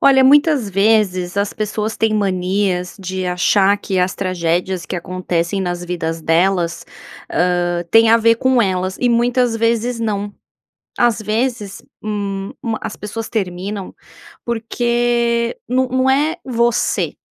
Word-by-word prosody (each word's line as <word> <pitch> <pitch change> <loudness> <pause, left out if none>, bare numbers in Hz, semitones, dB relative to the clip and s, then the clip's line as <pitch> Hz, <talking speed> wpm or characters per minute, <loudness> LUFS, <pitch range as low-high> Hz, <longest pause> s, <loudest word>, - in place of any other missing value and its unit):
Olha, 270 -1 +6
muitas 285 -4 +4
vezes 195 -2 +1
as 200 0 0
pessoas 215 0 -3
têm 220 -1 +1
manias 185 -2 -1
de 185 -1 -4
achar 190 +3 +3
que 195 -2 -3
as 180 0 +1
tragédias 180 -1 -1
que - - -5
acontecem 180 +1 -2
nas 175 -1 -3
vidas 165 -2 -3
delas, 170 +1 +1 0.5
hã, 175 -1 0
tem 225 0 +6
a 230 - +7
ver 230 0 +3
com 260 -1 +3
elas 185 -1 -1
e 250 - +2
muitas 240 0 +2
vezes 230 +1 0
não, 205 -2 -2 0.7
as 235 -2 +2
vezes, 215 -1 -2 0.2
hum, 200 -2 -3
ma 225 -1 -2
as - - -6
pessoas 220 +2 -6
terminam 195 -1 -4 0.5
porque 235 - 0
não 260 +1 +1
não 260 +1 +2
é 300 +5 +1
você. 240 -2 0
205 Hz, 135 wpm, -18 LUFS, 185-235 Hz, 0.7 s, a